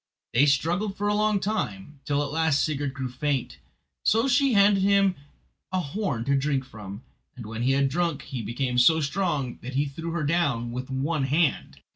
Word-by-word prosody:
They 140 +5 +5
struggled 175 +8 +1
for 205 - -1
a 205 - +2
long 210 -1 +2
time, 150 - -3
till 145 0 +1
at 145 - -5
last 160 -2 +2
Sigurd 145 -3 -2
grew 130 -3 -3
faint; 130 +1 -2 0.4
so 225 +4 +3
she 275 0 +3
handed 200 -1 +5
him 195 -1 +4 0.6
a 185 - 0
horn 140 - -3
to 140 +1 +2
drink 135 -1 0
from, 105 -3 -9 0.3
and 120 - -9
when 110 +1 -5
he 130 +2 +2
had 140 0 +3
drunk 170 +1 -1
he 130 -3 -5
became 125 +2 -1
so 160 +6 +5
strong 145 -4 -1
that 130 +2 -7
he 140 +2 +2
threw 160 +4 -6
her 165 -1 -2
down 140 -7 0
with 125 +2 -5
one 135 +2 -1
hand. 150 +3 0
145 Hz, 190 wpm, -26 LUFS, 130-175 Hz, 0.6 s, They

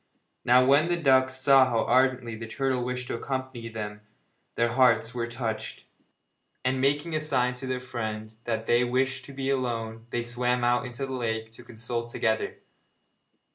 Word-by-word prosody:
Now, 125 +1 +5
when 140 +5 +5
the 175 0 +1
ducks 130 -4 +3
saw 130 0 +6
how 115 -1 +1
ardently 125 -1 +2
the 115 +1 -7
turtle 130 +1 -1
wished 125 0 -3
to - - -4
accompany 130 -1 -4
them 105 -2 -6 0.5
their 120 0 +2
hearts 120 -2 +3
were 120 -1 -2
touched, 115 -2 -4 0.8
and 130 0 +1
making 145 +4 +1
a - - +2
sign 130 -5 +1
to 130 - -5
their 130 0 -1
friend 110 -4 -5
that 115 -1 -2
they 120 +1 +3
wished 130 +1 0
to 140 - -10
be 135 0 -2
alone 115 -3 -3
they 120 -1 -2
swam 125 +1 0
out 120 +2 +2
into 125 +2 -4
the 135 - -6
lake 110 -3 -3
to 115 +2 -13
consult 115 0 -5
together. 110 -1 -1
125 Hz, 175 wpm, -27 LUFS, 115-130 Hz, 0.8 s, saw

